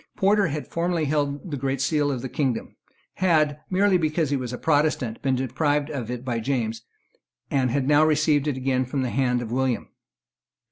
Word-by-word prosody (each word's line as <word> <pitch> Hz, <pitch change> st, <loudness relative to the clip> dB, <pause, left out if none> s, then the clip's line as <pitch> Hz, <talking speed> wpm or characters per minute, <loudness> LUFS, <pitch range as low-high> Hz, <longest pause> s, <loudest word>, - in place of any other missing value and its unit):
Porter 200 Hz, 0 st, +3 dB
had 150 Hz, -1 st, -4 dB
formerly 170 Hz, -1 st, -1 dB
held 145 Hz, +3 st, -1 dB
the 145 Hz, -, -2 dB
Great 135 Hz, 0 st, -2 dB
Seal 145 Hz, +1 st, +1 dB
of 130 Hz, -2 st, -4 dB
the -, -, -2 dB
kingdom, 130 Hz, -2 st, -2 dB, 0.4 s
had, 155 Hz, -5 st, +2 dB
merely 190 Hz, 0 st, +3 dB
because 155 Hz, -2 st, 0 dB
he -, -, +2 dB
was 125 Hz, -3 st, -3 dB
a 125 Hz, -, -4 dB
Protestant, 145 Hz, -7 st, +1 dB
been 135 Hz, -2 st, +1 dB
deprived 145 Hz, +3 st, 0 dB
of 125 Hz, -6 st, -4 dB
it 125 Hz, 0 st, -5 dB
by 120 Hz, -3 st, -1 dB
James, 115 Hz, -2 st, -2 dB, 0.7 s
and 130 Hz, -2 st, +2 dB
had 135 Hz, +2 st, 0 dB
now 150 Hz, +1 st, +5 dB
received 155 Hz, -1 st, +2 dB
it 140 Hz, -3 st, -1 dB
again 130 Hz, 0 st, 0 dB
from 130 Hz, +1 st, -2 dB
the 125 Hz, -, -2 dB
hand 125 Hz, -2 st, +1 dB
of 115 Hz, -, -7 dB
William. 130 Hz, -3 st, -1 dB
140 Hz, 190 wpm, -24 LUFS, 130-155 Hz, 0.7 s, now